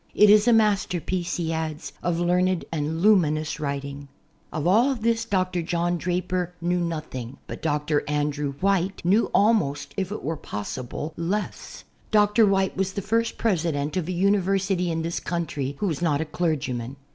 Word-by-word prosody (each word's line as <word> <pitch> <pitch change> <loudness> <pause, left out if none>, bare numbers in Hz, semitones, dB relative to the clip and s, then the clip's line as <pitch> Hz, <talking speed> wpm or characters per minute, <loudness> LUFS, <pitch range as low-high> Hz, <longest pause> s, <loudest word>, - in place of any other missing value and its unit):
"It 210 -1 +7
is 210 +2 +6
a - - +6
master 210 -5 +3
piece," 175 +1 -2
he 165 -2 -1
adds, 160 0 -4
"of 170 -1 0
learned 180 +1 +1
and 160 +1 -2
luminous 155 -7 +3
writing." 140 -1 -4 0.4
Of 155 - -3
all 235 +9 +4
this 230 0 0
Dr. 185 -4 0
John 175 +1 -1
Draper 180 0 -2
knew 175 +1 0
nothing 155 -7 -4
but - - -8
Dr. 150 -1 0
Andrew 145 -1 -1
White 190 +3 0
knew 200 +6 +3
almost, 145 -10 +2
if 190 -1 -2
it 210 - -5
were 160 +1 -2
possible, 130 +7 -5
less. 185 +6 -3 0.3
Dr. 210 0 +4
White 195 -1 +1
was 190 0 -1
the 200 - -4
first 230 +2 0
president 160 -8 0
of 180 -3 -1
a - - -2
university 195 -1 +1
in 165 -1 -1
this 170 +1 -2
country 145 -5 -3
who 205 - -2
was 160 -4 -2
not 150 -4 +2
a 160 - -1
clergyman. 135 -7 -2
175 Hz, 170 wpm, -25 LUFS, 150-195 Hz, 0.4 s, It